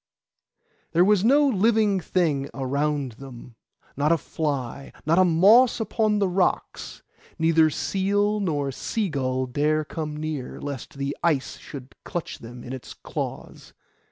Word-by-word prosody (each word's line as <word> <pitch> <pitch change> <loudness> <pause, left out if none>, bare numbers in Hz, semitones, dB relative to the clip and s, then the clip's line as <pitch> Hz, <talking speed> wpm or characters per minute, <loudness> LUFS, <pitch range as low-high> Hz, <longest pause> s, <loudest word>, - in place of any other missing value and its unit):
There 175 +2 +5
was 205 -1 +3
no 285 +5 +5
living 215 -3 +3
thing 155 -5 0
around 140 0 -1
them, 125 -3 -11 0.4
not 145 +3 +1
a 170 - +4
fly, 140 -5 -4
not 165 +4 +3
a - - +7
moss 200 +10 +5
upon 215 -1 +1
the 200 -1 +2
rocks. 180 0 -1 0.3
Neither 160 -1 +4
seal 205 +5 0
nor 145 -8 -1
sea 210 - -2
gull 130 -3 -1
dare 150 +4 0
come 150 0 -5
near, 150 -4 -5
lest 140 -3 -6
the 140 0 -2
ice 150 -6 0
should 135 -3 -10
clutch 175 -3 -5
them 120 +1 -10
in 125 - -7
its 130 - -8
claws. - - -7
155 Hz, 140 wpm, -25 LUFS, 140-195 Hz, 0.4 s, a